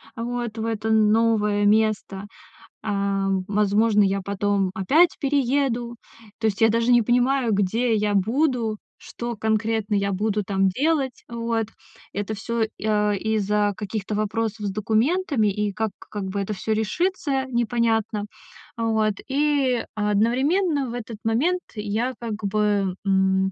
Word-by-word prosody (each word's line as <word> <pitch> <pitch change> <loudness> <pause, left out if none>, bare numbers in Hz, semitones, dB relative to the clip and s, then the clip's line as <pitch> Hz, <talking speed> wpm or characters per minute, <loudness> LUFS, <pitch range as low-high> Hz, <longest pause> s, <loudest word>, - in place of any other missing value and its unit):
вот, 235 -1 -4
в 225 - -2
это 220 -1 -2
новое 215 -1 +3
место. 210 -2 +1 0.6
А, 200 -1 0 0.2
возможно, 210 +1 +3
я 195 0 +1
потом 200 0 0
опять 305 - +3
перееду. 265 -3 0 0.4
То 225 - -2
есть 205 -1 0
я 225 - +6
даже 230 +2 +2
не 240 -1 +6
понимаю, 245 +1 +2
где 220 +4 +1
я 210 0 +1
буду, 230 +2 +1 0.2
что 235 0 -6
конкретно 220 0 0
я 200 0 +1
буду 210 +2 0
там 195 0 +1
делать. 275 - 0
Вот. 230 -1 -2 0.5
Это 205 +2 -3
всё, 230 +2 -3 0.2
и, - - -7
а, 210 -1 +2
из-за 210 0 0
каких-то 210 0 -4
вопросов 215 0 -2
с - - -1
документами. 225 - +1
И 210 0 -2
как 220 +1 -1
как 205 -2 -7
бы 190 +1 -3
это 200 +2 -2
всё 215 +3 -2
решится, 270 - -1
непонятно. 230 -3 0 0.5
Вот, 220 -2 +1
и 275 -3 +1
одновременно 260 - +1
в - - -6
этот 235 -2 -6
момент 300 +12 +1
я 215 +4 -2
как 230 -3 -4
бы, 205 -2 +1
м, 190 0 +2
220 Hz, 140 wpm, -23 LUFS, 205-240 Hz, 0.6 s, я